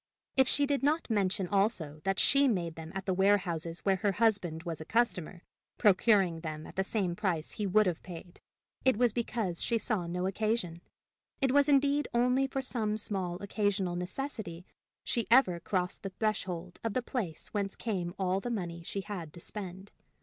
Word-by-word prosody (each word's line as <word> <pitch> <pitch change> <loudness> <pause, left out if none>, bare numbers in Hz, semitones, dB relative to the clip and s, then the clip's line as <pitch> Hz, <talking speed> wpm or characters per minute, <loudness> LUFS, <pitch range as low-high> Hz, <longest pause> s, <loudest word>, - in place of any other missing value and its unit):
If 265 -1 +5
she 285 - +3
did 280 -1 0
not 295 -1 +1
mention 195 -2 +1
also 185 -7 0
that 195 0 +1
she 280 +1 +4
made 175 -8 0
them 160 0 -8
at 190 - -4
the 190 - +1
warehouses 180 -4 +1
where 195 -1 +2
her 200 +1 +1
husband 195 -7 +1
was 165 -3 -4
a - - -3
customer, 185 -4 0 0.3
procuring 195 -4 +4
them 155 -1 -5
at - - -11
the 190 - +1
same 190 -4 -1
price 175 -6 -1
he 210 - -3
would 215 +3 +4
have 175 -3 -1
paid, 175 -1 -10 0.4
it 260 -5 +4
was 240 -2 +3
because 220 -7 -2
she 235 - +1
saw 210 -6 -1
no 180 +2 -2
occasion. 195 -4 -1 0.6
It 270 -2 +2
was 285 +1 +4
indeed 285 +1 +3
only 250 +3 +3
for 270 0 -3
some 220 -5 -1
small 190 -4 -1
occasional 200 -3 0
necessity 180 -2 -5 0.4
she 235 - -1
ever 230 -8 +5
crossed 180 +1 -2
the 195 - -4
threshold 185 -4 -3
of 225 -2 -2
the 255 - +1
place 215 - -4
whence 200 -2 -2
came 185 -6 -3
all 190 0 +1
the 245 - -4
money 175 -7 -3
she 195 +4 -4
had 185 -6 -6
to - - -9
spend. 190 +1 -6
195 Hz, 185 wpm, -31 LUFS, 175-230 Hz, 0.6 s, If